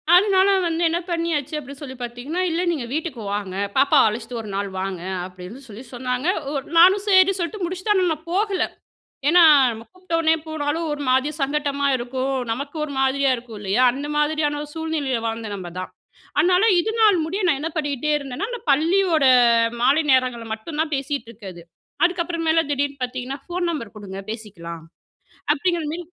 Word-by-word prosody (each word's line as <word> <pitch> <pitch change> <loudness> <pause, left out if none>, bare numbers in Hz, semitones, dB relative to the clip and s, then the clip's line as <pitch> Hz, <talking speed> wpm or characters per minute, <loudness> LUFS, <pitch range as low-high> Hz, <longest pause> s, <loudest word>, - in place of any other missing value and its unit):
அதனால 385 0 +5 0.2
வந்து 330 0 -2
என்ன 335 +1 0
பண்ணியாச்சு? 330 -4 -1
அப்டின்னு 280 -1 -9
சொல்லி 260 -3 -7
பார்த்தீங்கன்னா, 245 +9 -4
இல்ல 330 +2 0
நீங்க 290 -8 -3
வீட்டுக்கு 310 -6 -3
வாங்க. 200 -2 -4 0.2
பாப்பாவ 275 +1 +5
அழைச்சுட்டு 225 +2 -4
1 215 - -9
நாள் 200 0 -2
வாங்க. 190 -2 -4 0.2
அப்டின்னு 185 +6 -10
சொல்லி 220 +2 -10
சொன்னாங்க. 250 +3 -2 0.2
ஒ - - -4 0.2
நானும் 375 +4 +6
சரின்னு 380 -1 +5
சொல்லிட்டு 365 +3 -3
முடிச்சிட்டேன் 370 +4 -1
ஆனா, 370 - +3
நான் 315 +1 -11
போகல. 390 -2 +1 0.7
ஏனா, 350 +2 +6 0.3
நம்ம 225 0 -8
கூப்பிட்ட 370 -2 -10
உடனே 320 0 +3
போனாலும் 315 +1 -2
ஒரு 295 0 -4
மாரி 260 +3 +2
சங்கட்டமா 285 0 0
இருக்கும். 260 +2 -3 0.2
நமக்கு 280 +6 -4
ஒரு 305 - -5
மாதிரியா 270 0 +2
இருக்கும் 235 -2 -10
இல்லயா? 205 +4 0
அந்த 280 +3 -5
மாரியான 295 -1 0
ஒரு 295 - -10
சூழ்நிலயில 310 -6 -2
வாழ்ந்த 225 -1 -3
நம்ப 185 -3 -7
தான். 185 - -6 0.5
அதனால 365 +2 +4 0.2
இதனால் 440 +1 +3
முடிய 375 +6 -3
நான் 290 -5 +2
என்ன 315 +3 -3
பண்ணிகிட்டே 290 -1 -2
இருந்தேன்னா 280 +7 -5
அந்த 485 -1 -5
பள்ளியோட 325 +1 +3 0.6
மாலை 275 +6 +4
நேரங்கள்ல 255 -3 +2
மட்டும் 295 +8 -7
தான் 315 -1 -2
பேசிட்டு 275 -2 -3
இருக்கது. 195 -6 -10 0.4
அதுக்கப்புறமேல 335 -2 +1
திடீர்னு 280 0 -1
பார்த்தீங்கன்னா, 255 +2 -4
ஃபோன் 350 0 -2
நம்பர் 235 -10 -6
குடுங்க 195 -2 -8
பேசிக்கலாம் 170 -7 -8 0.7
அப்டிங்கிற 340 +2 -1
மாரி 345 +3 -5
290 Hz, 165 wpm, -22 LUFS, 245-335 Hz, 0.7 s, நானும்